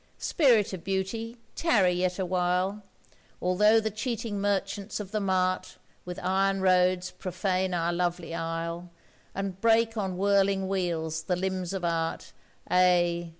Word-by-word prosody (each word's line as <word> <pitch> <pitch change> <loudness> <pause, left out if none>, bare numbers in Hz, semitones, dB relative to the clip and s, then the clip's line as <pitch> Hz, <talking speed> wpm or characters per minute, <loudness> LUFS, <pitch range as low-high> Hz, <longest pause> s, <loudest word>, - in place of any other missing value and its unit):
Spirit 235 - +3
of 180 - -6
Beauty, 210 +5 -3 0.2
tarry 205 - +3
yet 180 0 0
awhile! 185 +2 0 0.6
Although 210 +5 +4
the 220 0 -2
cheating 215 -2 -3
merchants 200 +1 -2
of 200 -2 -7
the 215 - 0
mart 185 -2 0 0.3
With 180 0 -6
iron 195 +1 +1
roads 185 -1 +2
profane 185 0 -2
our 170 0 0
lovely 175 -1 -2
isle, 165 +1 -4 0.5
And 195 -1 -4
break 225 0 +3
on 190 -3 -2
whirling 195 0 +2
wheels 165 -4 -1
the 180 - +1
limbs 185 -1 -2
of 190 -3 -3
Art, 165 -1 -2 0.4
Ay! 175 -1 +3
185 Hz, 135 wpm, -28 LUFS, 180-200 Hz, 0.6 s, Although